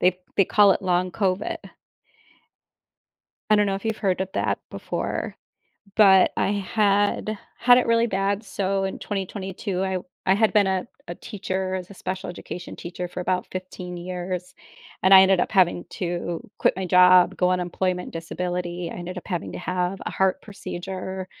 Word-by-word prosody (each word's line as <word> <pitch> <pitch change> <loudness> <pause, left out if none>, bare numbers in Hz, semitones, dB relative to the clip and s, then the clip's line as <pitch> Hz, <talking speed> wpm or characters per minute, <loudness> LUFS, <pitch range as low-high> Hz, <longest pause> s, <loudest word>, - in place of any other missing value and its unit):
they 180 0 +3 0.2
they 195 - +5
call 205 +1 +5
it - - -3
Long 180 -1 +1
Covid. 195 -1 -1 1.9
I 215 - +7
dunno 205 -2 +2
if 195 - -7
you've 220 -1 -1
heard 190 -3 0
of 190 - -3
that - - 0
before - - -4 0.6
but 195 -3 +6
I - - +1
had 205 +1 +1 0.2
had 245 0 +6
it 250 - +1
really 230 0 +3
bad. 200 +1 -1
So, 195 -1 -1
in 190 - -3
2022, 195 -1 -4
I 190 - -1
w 185 - -3 0.2
I 190 - +5
had 220 +1 +3
been 205 -2 +4
a 190 -1 -1 0.2
a 175 - -4
teacher, 190 -2 -4
as 185 0 -5
a - - -10
special 185 0 -5
education 175 0 -8
teacher, 180 +1 -6
for 180 - -6
about 180 0 -1
15 185 -1 -6
years 180 0 -5 0.5
and 190 +1 +4
I 190 - +11
ended 190 -1 +4
up - - 0
having 180 -3 +3
to 175 -1 -4
quit - - +3
my 190 -1 -3
job, 180 +1 +6
go 180 - +2
on 185 - +2
employment 180 +1 -2
disability, 175 +1 -4
ended 180 +1 -7
up - - -11
having 175 -4 -3
to - - -6
have 180 +1 -2
a - - -1
heart 190 -1 +1
procedure 190 -1 -6
185 Hz, 175 wpm, -24 LUFS, 180-195 Hz, 1.9 s, I